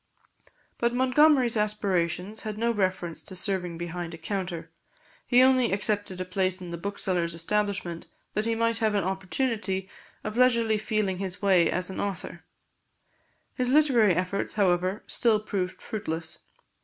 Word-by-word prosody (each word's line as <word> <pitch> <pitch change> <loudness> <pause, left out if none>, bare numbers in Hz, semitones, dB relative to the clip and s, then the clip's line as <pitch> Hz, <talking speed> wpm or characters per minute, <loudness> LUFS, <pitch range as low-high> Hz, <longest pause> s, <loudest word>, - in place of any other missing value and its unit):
But 235 0 +1
Montgomery's 260 -1 +4
aspirations 205 -2 0
had 215 -1 -5
no 235 +2 +1
reference 185 -5 -1
to 190 - -8
serving 185 -3 -2
behind 175 0 -5
a - - -11
counter; 170 -2 -4 0.6
he 250 0 +6
only 260 -2 +4
accepted 205 -1 -1
a 185 - -2
place 185 0 0
in 180 -2 -8
the 170 - -4
bookseller's 180 -3 -2
establishment 190 -1 -2 0.3
that 210 - -1
he 230 0 +1
might 230 0 +1
have 220 -2 +1
an 200 - +1
opportunity 190 +1 -2 0.4
of 215 +2 -4
leisurely 235 -4 +3
feeling 210 -3 -1
his 190 -1 -3
way 185 -4 +4
as 180 +1 -1
an - - -6
author. 195 -3 -4 1.1
His 250 -2 0
literary 255 - +4
efforts, 185 +2 -2
however, 185 0 +1
still 225 -3 +2
proved 195 -4 -3
fruitless. 165 -7 -4
200 Hz, 145 wpm, -27 LUFS, 180-220 Hz, 1.1 s, he